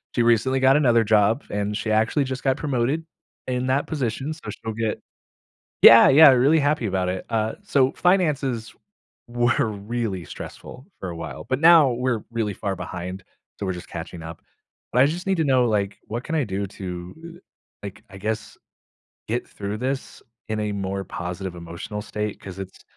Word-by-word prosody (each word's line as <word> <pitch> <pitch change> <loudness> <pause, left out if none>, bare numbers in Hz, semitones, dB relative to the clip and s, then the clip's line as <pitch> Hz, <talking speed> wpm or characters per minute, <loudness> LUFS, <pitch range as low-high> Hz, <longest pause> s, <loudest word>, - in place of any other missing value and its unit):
She 120 - +3
recently 120 +3 +3
got 135 +2 +5
another 120 -6 +4
job, 110 +4 +3
and 105 0 -2
she 110 0 -2
actually 110 +7 +2
just 130 0 -5
got 135 -1 +2
promoted 140 +3 -1 0.4
in 125 0 -1
that 135 +2 +1
position, 135 +1 -2
so 160 - -10
she'll 110 -1 -6
get 110 -1 -2 0.8
Yeah, 115 - +10
yeah, 145 +2 +9
really 135 +5 +4
happy 145 -4 +1
about 95 -2 0
it. 95 - -5
Uh, 110 -1 -1
so 135 -9 +2
finances 145 - +1 0.5
were 120 -1 +1
really 105 -3 -4
stressful 130 - -10
for 95 - -5
a 85 - -6
while, 80 -1 -7
but 130 +1 0
now 165 -5 +7
we're 120 -2 -1
really 110 -3 -1
far 100 0 -3
behind, 90 +1 -6 0.3
so 100 - -4
we're 95 - -1
just 90 0 -9
catching 85 0 -7
up. 80 0 -9 0.5
But 125 - +4
I - - +6
just 170 +6 -2
need 190 -2 +2
to 160 - +1
know, 130 -3 +3
like, 100 -1 -1
what 120 +4 -4
can 160 - -2
I 150 - +2
do 100 -2 -3
to, 95 - -8
uh, - - -20 0.4
like, 100 -2 -8
I 95 - -11
guess, 110 +2 -4 0.7
get 120 +2 -2
through 100 +1 -5
this 130 +2 -4 0.3
in 110 0 -2
a 105 -1 -2
more 95 -1 -3
positive 90 +1 -5
emotional 85 +5 -7
state? 105 -1 -4
'Cause 95 -1 -9
it's 95 -1 -9
115 Hz, 185 wpm, -23 LUFS, 100-130 Hz, 0.8 s, Yeah